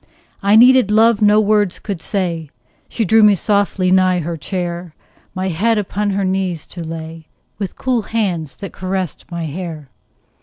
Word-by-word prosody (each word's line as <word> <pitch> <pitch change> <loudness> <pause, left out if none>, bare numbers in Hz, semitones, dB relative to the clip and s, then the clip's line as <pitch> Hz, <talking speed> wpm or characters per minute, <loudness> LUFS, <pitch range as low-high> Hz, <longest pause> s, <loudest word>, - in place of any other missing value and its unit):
I 200 +1 +3
needed 250 -1 +6
love 220 +1 +4
no 210 0 +5
words 210 -3 +2
could 195 -6 -6
say; 170 -6 -3 0.4
She 225 - -1
drew 220 +4 +4
me 210 -1 +6
softly 200 -2 0
nigh 185 -1 +4
her 170 0 -3
chair, 175 0 -5 0.4
My 185 +1 -2
head 215 +7 +1
upon 205 0 -1
her 195 0 -1
knees 185 -4 -2
to 175 - -6
lay, 160 0 -8 0.3
With 200 -3 -4
cool 255 -3 0
hands 190 -9 -2
that 200 - -8
caressed 185 -2 -4
my 170 -1 -4
hair. 155 -3 -7
190 Hz, 160 wpm, -18 LUFS, 170-210 Hz, 0.4 s, needed